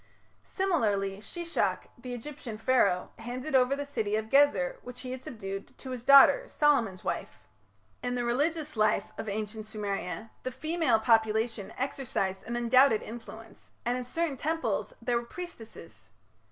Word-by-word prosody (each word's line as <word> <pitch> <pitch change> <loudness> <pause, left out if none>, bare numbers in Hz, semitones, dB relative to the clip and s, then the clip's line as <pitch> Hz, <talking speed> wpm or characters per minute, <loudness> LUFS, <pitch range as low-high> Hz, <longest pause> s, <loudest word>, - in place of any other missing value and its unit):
Similarly 210 - 0
Shishak, 340 - -2
the 245 +1 -6
Egyptian 245 -3 -7
Pharaoh, 215 -6 +2
handed 255 +5 -5
over 260 +1 +4
the 285 0 -4
city 220 -7 -1
of 220 0 -2
Gezer, 275 -10 +4
which 250 0 -9
he 255 - -6
had 255 0 -5
subdued, 195 -5 -7
to 260 - -8
his 250 -2 -5
daughter, 280 - +8
Solomon's 235 -11 +2
wife. - - -3 0.6
In 245 0 -2
the 245 - -1
religious 300 +5 0
life 215 0 +2
of 220 - -3
ancient 215 +1 -4
Sumeria 205 -2 -4
the 255 - -3
female 310 -2 +1
population 220 -1 +2
exercised 235 -8 -2
an 240 - -4
undoubted 240 0 +4
influence, 225 0 -10 0.2
and 240 +1 +1
in 250 - -3
certain 295 +3 -2
temples 325 - -1
there 245 -1 +1
were 235 - -2
priestesses. 345 -9 -10
245 Hz, 150 wpm, -29 LUFS, 215-275 Hz, 0.6 s, daughter